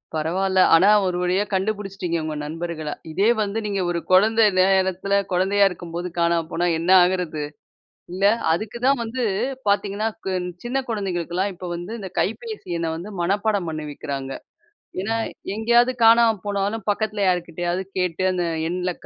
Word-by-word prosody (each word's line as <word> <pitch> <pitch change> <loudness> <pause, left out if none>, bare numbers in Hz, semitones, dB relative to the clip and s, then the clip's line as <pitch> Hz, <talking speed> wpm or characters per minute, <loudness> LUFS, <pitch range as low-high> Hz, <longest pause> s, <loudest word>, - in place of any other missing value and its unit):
பரவால்ல. 185 +4 0 0.2
ஆனா, 190 +5 +5 0.2
ஒரு 180 -1 -1
வழியா 185 +3 +1
கண்டுபிடிச்சிட்டீங்க 195 -3 -2
உங்க 155 -1 -4
நண்பர்கள. 160 0 -5 0.2
இதே 195 +8 +2
வந்து 210 +1 -1
நீங்க 200 -2 -1
ஒரு 170 - -1
குழந்த 215 +5 +5 0.2
நேரத்துல 190 +1 +2 0.2
குழந்தையா 195 +3 +3
இருக்கும்போது 175 0 -6
காணாம 170 -1 +2
போனா 175 +1 0
என்ன 170 +3 +1
ஆகுறது? 180 -4 -1 0.7
இல்ல 190 +2 -2 0.3
அதுக்கு 215 +7 -3
தான் 275 -2 +3
வந்து 235 +3 -3 0.5
பார்த்தீங்கன்னா, 205 +1 +1 0.2
கு - - 0 0.3
சின்ன 255 +3 -1
குழந்தைகளுக்கெல்லாம் 190 -2 -2
இப்ப 180 0 -7
வந்து 175 +6 -7
இந்த 190 -3 -7
கைபேசி 430 - -4
எண்ண 165 -1 -1
வந்து 185 +6 -7
மனப்பாடம் 200 +1 0
பண்ணி 155 -1 -5
வைக்கிறாங்க. 135 -2 -5 0.7
ஏன்னா, 225 +3 -1 0.4
எங்கேயாவது 235 +3 +3
காணாம 230 -1 +6
போனாலும் 205 +1 -2
பக்கத்தில 210 -1 -1
யாருக்கிட்டயாவது 175 0 -1 0.2
கேட்டு 180 0 -1
அந்த 180 -1 -1 0.2
எண்ல 180 0 -2
190 Hz, 140 wpm, -22 LUFS, 175-205 Hz, 0.7 s, காணாம